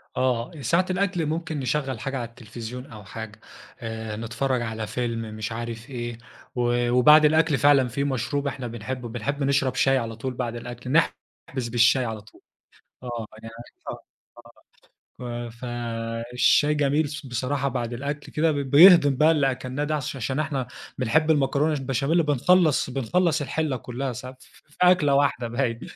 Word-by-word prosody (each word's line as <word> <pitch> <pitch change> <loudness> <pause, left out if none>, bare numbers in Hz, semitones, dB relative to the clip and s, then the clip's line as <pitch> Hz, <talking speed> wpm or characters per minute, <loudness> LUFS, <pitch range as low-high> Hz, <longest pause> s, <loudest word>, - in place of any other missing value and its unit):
آه، 125 0 0
ساعة 170 +6 +2
الأكل 180 -3 0
ممكن 160 -1 -3
نشغِّل 130 -2 -2
حاجة 135 +3 -3
على 120 -2 -4
التليفزيون 120 +1 -8
أو 110 -6 -11
حاجة، 110 +1 -8 0.4
آآ، 110 -2 -5
نتفرَّج 120 +3 -2
على 110 -2 -4
فيلم، 115 +1 -2
مش 110 +1 -4
عارف 115 +2 -6
إيه. 120 -2 -5 0.4
و 120 0 +1
وبعد 150 +5 +7
الأكل 160 -1 +3
فعلًا، 140 -3 +5
في 140 +4 -2
مشروب 140 +1 -1
إحنا 130 -2 -4
بنحبه، 120 +2 -6
بنحب 130 +5 -3
نشرب 140 -1 +1
شاي 135 0 +3
على 115 -2 -3
طُول 130 +3 -4
بعد 120 -1 -3
الأكل، 120 +2 -7
نحبِس 130 -5 -1
بالشاي 125 +2 +4
على 110 -2 -5
طُول. 105 - -20 0.6
آه، 120 -3 -5 0.2
يعني 115 0 -9 0.3
آه، - - -5 1.2
آه، 120 -1 -5
ف - - -16
فالشاي 120 +4 0
جميل، 145 +1 +1
ص 145 -1 -7
بصراحة، 130 +3 -1
بعد 120 -2 -3
الأكل 140 +4 -5
كده، 155 +1 +2
ب - - -3
بيهضِّم 145 +1 +7
بقى 155 +4 +5
اللي 140 -4 +3
أكلناه 130 +3 -4
ده، 155 +1 -1
عش 140 -2 -3
عشان 135 +3 -2
إحنا 140 -5 -2 0.3
بنحب 155 +7 +2
المكرونة 145 +1 +2
البشاميل، 140 +5 +1
بنخلِّص 150 0 +3
بنخلِّص 155 +5 +1
الحلّة 145 -1 -1
كُلّها 125 +2 -4
ساعات، 130 +2 -9
ف - - -17 0.2
في - - -23
أكلة 180 -6 +5
واحدة، 135 -4 +1
باين. 120 -1 -1
130 Hz, 160 wpm, -25 LUFS, 120-145 Hz, 1.2 s, وبعد